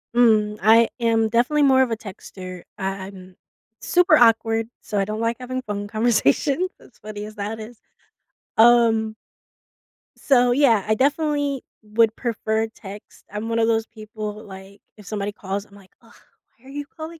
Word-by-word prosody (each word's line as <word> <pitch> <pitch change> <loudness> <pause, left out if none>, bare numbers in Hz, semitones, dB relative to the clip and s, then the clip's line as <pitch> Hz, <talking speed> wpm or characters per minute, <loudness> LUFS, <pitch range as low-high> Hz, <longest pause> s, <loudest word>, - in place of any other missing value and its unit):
Mm, 215 -3 +3
I 225 +2 +6
am 225 -1 +2
definitely 245 +7 +2
more 265 -1 +5
of 255 - +1
a 225 - -1
texter. 185 -3 -10
I 190 - -4 0.2
I'm 185 -2 -13 0.5
super 360 +1 +4
awkward, 225 -1 +3
so 210 - -4
I 195 - +2
don't 215 +2 -4
like 230 +1 -1
having 255 +1 -4
phone 205 0 -4
conversations, 240 - +1
as 250 - -20
funny 210 0 -7
as 215 0 -10
that 210 +1 -5
is. 220 +1 -11 0.8
Um 225 -1 +4 1.0
So, 250 -3 +3
yeah, 245 -6 +3
I 215 - +2
definitely 285 +1 0 0.2
would 220 +1 +2
prefer 220 -2 -1
text. 205 -2 -13
I'm 210 +2 -5
one 230 0 0
of 225 - +3
those 225 -1 +1
people, 215 -1 -8
like, 195 0 -12 0.2
if 210 - -14
somebody 205 0 -3
calls, 200 0 -5
I'm 200 - -20
like, 195 -2 -18
"Ugh, - - -21 0.4
why 260 - -26
are - - -13
you 290 +1 -5
calling 320 +3 -10
225 Hz, 170 wpm, -22 LUFS, 210-245 Hz, 1.0 s, I